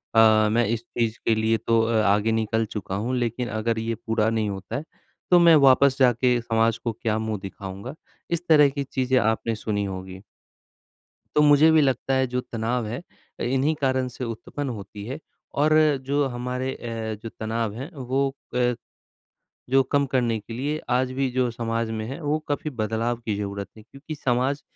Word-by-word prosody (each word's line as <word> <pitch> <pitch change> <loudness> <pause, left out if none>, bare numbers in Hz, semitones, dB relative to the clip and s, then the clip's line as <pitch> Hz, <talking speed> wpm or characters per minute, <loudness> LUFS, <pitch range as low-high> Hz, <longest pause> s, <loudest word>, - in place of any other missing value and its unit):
अ, 110 -1 +6
मैं 120 +1 +3
इस 115 +1 -2
चीज़ 115 -1 -2
के 110 - +3
लिए 110 +1 +2
तो 115 +1 +2
अ, 115 -1 +2
आगे 105 +3 +3
निकल 110 0 0
चुका 105 -3 -5
हूँ 120 +6 -1
लेकिन 120 0 -1
अगर 110 +1 -1
ये 115 0 -2
पूरा 110 0 0
नहीं 110 -2 0
होता 95 -1 -6
है, 145 - -3 0.5
तो 175 - +8
मैं 170 -2 +7
वापस 135 -1 +5
जाके 125 -1 +3
समाज 115 0 +1
को 115 - -3
क्या 110 -1 0
मुँह 110 -2 -3
दिखाऊँगा? 100 +6 -7 0.3
इस 170 0 -1
तरह 150 -3 +7
की 140 0 -3
चीज़ें 130 -1 0
आपने 110 0 0
सुनी 105 -2 -2
होंगी। 95 0 -7 1.1
तो 150 - +4
मुझे 150 +2 +6
भी 160 - +6
लगता 135 -1 +1
है 130 0 +2
जो 125 +1 -2
तनाव 115 0 -2
है 115 +4 -4 0.4
अ, - - -1
इन्ही 135 +5 +1
कारण 130 -1 +1
से 125 +1 -6
उत्पन्न 125 +5 -5
होती 105 -2 -7
है, 135 +5 -5 0.4
और 150 +2 +2 0.3
जो 145 +1 +2
हमारे 125 +1 -3
अ, 115 -2 -5
जो 115 - -5
तनाव 110 -1 -2
है 135 +9 -6
वो 135 +1 0 0.3
अ, 125 0 +2 1.0
जो 135 +1 +5
कम 140 +1 +1
करने 120 -4 +1
के 115 +2 -10
लिए 145 +5 -2
आज 130 +1 +1
भी 130 0 0
जो 125 -1 +1
समाज 115 -1 -2
में 110 -1 -3
है, 135 +6 -6
वो 150 +1 0
काफ़ी 145 +1 -2
बदलाव 115 0 -1
की 105 -2 -1
ज़रूरत 100 -1 -4
है, 110 - -13
क्योंकि 140 +6 -9
समाज 130 +2 0
120 Hz, 190 wpm, -24 LUFS, 110-130 Hz, 1.1 s, तो